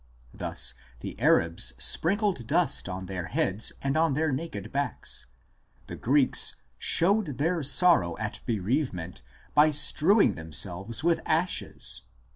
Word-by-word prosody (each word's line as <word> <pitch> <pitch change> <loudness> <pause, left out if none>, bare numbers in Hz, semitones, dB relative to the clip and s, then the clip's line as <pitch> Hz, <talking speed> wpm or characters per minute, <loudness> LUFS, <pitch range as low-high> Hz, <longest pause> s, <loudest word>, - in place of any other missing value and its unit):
Thus, 65 -2 0 0.3
the - - -7
Arabs 80 -7 +3
sprinkled 180 - 0
dust - - +1
on 95 0 -5
their 90 -2 -5
heads 100 +4 -1
and 135 +1 -1
on 160 -3 +2
their 155 0 0
naked 160 +4 -5
backs 140 - -3
l; - - -38
the - - -8
Greeks 135 +2 +2
" 65 - -41
showed 180 - +2
their 165 +3 0
sorrow 140 - +3
at 105 -1 -4
bereavement 105 - -2 0.3
by 150 +1 +5
strew 155 +5 +3
1 195 - +4
Wellhausen, 80 -2 -9 0.2
op. 95 +6 -8
cit., - - +3
p. - - -4
177. 170 +1 -1
135 Hz, 145 wpm, -27 LUFS, -, 0.3 s, by